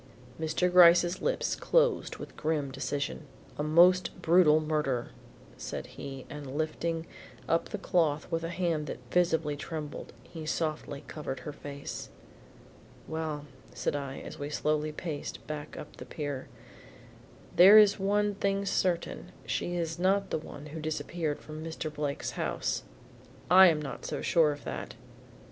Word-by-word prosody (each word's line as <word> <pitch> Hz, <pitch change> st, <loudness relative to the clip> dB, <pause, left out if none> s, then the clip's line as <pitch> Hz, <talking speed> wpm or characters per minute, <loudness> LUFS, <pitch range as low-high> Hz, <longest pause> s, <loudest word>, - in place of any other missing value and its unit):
Mr. 160 Hz, +3 st, +1 dB
Gryce's 175 Hz, 0 st, +6 dB
lips -, -, 0 dB
closed -, -, +2 dB
with -, -, -9 dB
grim 150 Hz, -3 st, -1 dB
decision. 140 Hz, +1 st, -3 dB, 0.3 s
"A -, -, +2 dB
most 175 Hz, +4 st, +4 dB
brutal 160 Hz, -2 st, +5 dB
murder," 150 Hz, -6 st, -1 dB, 0.5 s
said -, -, -5 dB
he 135 Hz, -2 st, -8 dB
and 145 Hz, -1 st, -7 dB
lifting 160 Hz, +1 st, -2 dB, 0.4 s
up 165 Hz, -, +1 dB
the -, -, -3 dB
cloth 160 Hz, -6 st, +1 dB
with 165 Hz, 0 st, -1 dB
a 165 Hz, -, -2 dB
hand 170 Hz, -4 st, -1 dB
that -, -, -4 dB
visibly 160 Hz, -4 st, +2 dB
trembled, 150 Hz, 0 st, -6 dB
he 160 Hz, -2 st, -9 dB
softly 155 Hz, -2 st, -2 dB
covered 140 Hz, -4 st, -5 dB
her 150 Hz, -, -6 dB
face. 140 Hz, -1 st, -7 dB, 1.0 s
"Well," 160 Hz, -2 st, -3 dB, 0.3 s
said -, -, -1 dB
I 140 Hz, -2 st, -4 dB
as -, -, -9 dB
we 145 Hz, 0 st, -4 dB
slowly 150 Hz, 0 st, 0 dB
paced 150 Hz, -1 st, -6 dB
back 150 Hz, 0 st, -6 dB
up 150 Hz, -, -9 dB
the -, -, -8 dB
pier, 145 Hz, -3 st, -4 dB, 1.1 s
"there 195 Hz, +4 st, +10 dB
is 210 Hz, -2 st, +7 dB
one 205 Hz, +1 st, +2 dB
thing 200 Hz, 0 st, 0 dB
certain, 180 Hz, -1 st, -1 dB
she 175 Hz, -, -2 dB
is 165 Hz, -1 st, -2 dB
not 195 Hz, +2 st, +2 dB
the -, -, 0 dB
one 150 Hz, -1 st, -10 dB
who 160 Hz, -, -5 dB
disappeared 155 Hz, 0 st, -2 dB
from 155 Hz, 0 st, -8 dB
Mr. 160 Hz, -1 st, -5 dB
Blake's 145 Hz, -1 st, -3 dB
house." -, -, -2 dB, 0.7 s
"I 190 Hz, +1 st, +10 dB
am 160 Hz, -3 st, +3 dB
not 140 Hz, -4 st, -6 dB
so -, -, -4 dB
sure 160 Hz, -3 st, +4 dB
of 145 Hz, 0 st, -7 dB
that." -, -, -5 dB
155 Hz, 150 wpm, -30 LUFS, 150-175 Hz, 1.1 s, there